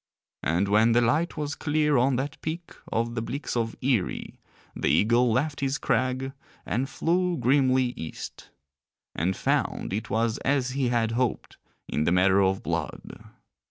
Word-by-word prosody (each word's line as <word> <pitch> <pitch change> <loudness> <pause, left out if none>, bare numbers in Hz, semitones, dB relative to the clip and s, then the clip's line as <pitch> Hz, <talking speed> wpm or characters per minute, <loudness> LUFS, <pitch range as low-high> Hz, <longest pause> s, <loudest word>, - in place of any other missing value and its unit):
And 85 +5 +1
when 110 +3 +4
the 120 - +4
light 150 +9 +1
was 145 -1 -2
clear 150 0 +1
on 130 +1 +3
that 140 +5 -3
peak 165 +2 -5 0.2
of 115 +1 0
the 115 - -2
Bleaks 140 +5 -4
of 115 -1 -1
Eerie 125 -8 -1 0.4
the - - -1
eagle 115 - +3
left 145 +5 0
his 135 0 0
crag 130 0 0 0.3
and 130 +6 -1
flew 175 +4 0
grimly 130 -1 +3
East, 80 - -8 0.6
and 90 +4 0
found - - 0
it 105 +2 -3
was 115 0 0
as 135 -2 0
he 135 -1 0
had 115 -2 +1
hoped 120 0 -2 0.3
in 75 - -1
the - - +2
matter 95 +2 +4
of 95 0 +1
blood. - - -4
125 Hz, 160 wpm, -26 LUFS, 110-140 Hz, 0.6 s, when